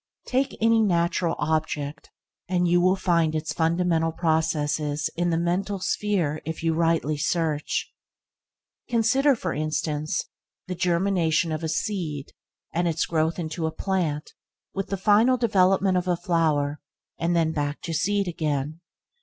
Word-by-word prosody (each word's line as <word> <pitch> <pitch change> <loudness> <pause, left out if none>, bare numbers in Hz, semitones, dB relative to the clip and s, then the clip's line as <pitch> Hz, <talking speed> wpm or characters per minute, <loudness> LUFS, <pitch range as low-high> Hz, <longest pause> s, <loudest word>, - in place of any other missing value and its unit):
Take 265 +2 0
any 225 0 +4
natural 170 -3 +1
object, 150 -2 -2 0.4
and 180 -1 +2
you 175 +1 +4
will 185 +1 +4
find 170 -4 +1
its 155 0 -2
fundamental 165 0 +1
processes 155 -2 0
in 175 +1 0
the 165 - +1
mental 180 +4 0
sphere 180 -6 0
if 160 +1 -5
you 165 -1 +2
rightly 165 -2 +1
search. 155 -1 -1 1.0
Consider, 250 +4 +3
for 180 -7 -3
instance, 155 0 -2 0.4
the 185 - -4
germination 170 -2 +1
of 155 +1 -3
a 160 - -1
seed 155 -4 -3 0.4
and 175 +1 +1
its 160 -1 0
growth 160 0 0
into 160 -1 -3
a - - -2
plant 165 -5 -2 0.4
with 195 -1 -3
the 195 - -1
final 215 +6 +4
development 195 -4 +3
of 180 0 -1
a 175 -1 +1
flower, 155 -5 0 0.4
and 165 -1 +1
back 145 -1 -2
to 165 - -4
seed 200 +4 +1
again. 155 -1 -2
165 Hz, 140 wpm, -25 LUFS, 155-185 Hz, 1.0 s, any